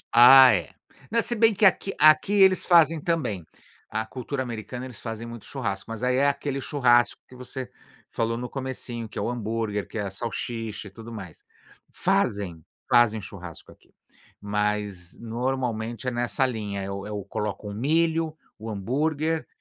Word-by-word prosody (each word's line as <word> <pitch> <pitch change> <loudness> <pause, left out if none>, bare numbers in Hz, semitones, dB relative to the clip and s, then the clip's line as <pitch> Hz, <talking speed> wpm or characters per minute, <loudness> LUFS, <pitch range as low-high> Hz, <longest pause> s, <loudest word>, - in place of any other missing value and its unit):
Ah, 130 +2 +10
é. - - -1 0.4
Né, 230 0 +3
se 240 - -1
bem 225 -1 +4
que 210 - +3
aqui 195 +1 +3
aqui 155 +6 +6
eles 190 -2 +5
fazem 165 -3 +5
também. 135 - -1 0.5
A 110 +1 -2
cultura 130 +3 -5
americana, 120 +1 -6
eles 125 -4 -9
fazem 115 0 -6
muito 115 -2 -9
churrasco, 100 -8 -4
mas, 115 +2 -6
aí, 125 0 +2
é 140 +1 +4
aquele 140 -1 -1
churrasco 120 -4 +3
que 125 - -15
você, 125 0 -7 0.4
falou 115 0 -1
no 125 - -4
comecinho, 130 -3 -5
que - - -11
é - - -1
o - - -1
hambúrguer, 110 -3 -2
que - - -8
é - - -1
a 95 - -4
salsicha 115 0 -4
e - - -9
tudo 115 +3 -11
mais. 95 -7 -9 0.5
Fazem? 90 -6 0 0.3
Fazem 120 -3 +4
churrasco 90 -3 -10
aqui, - - -22 0.5
mas 105 -3 -2
normalmente 120 0 -3
é 125 - +1
nessa 120 +1 0
linha. 105 -5 -3
É 95 - -5
o 100 0 -4 0.2
o - - -13
colocam 105 0 -4
o - - -7
milho, 160 +6 +1 0.2
o 110 - -6
hambúrguer, 150 +10 -1
120 Hz, 170 wpm, -25 LUFS, 105-135 Hz, 0.5 s, Ah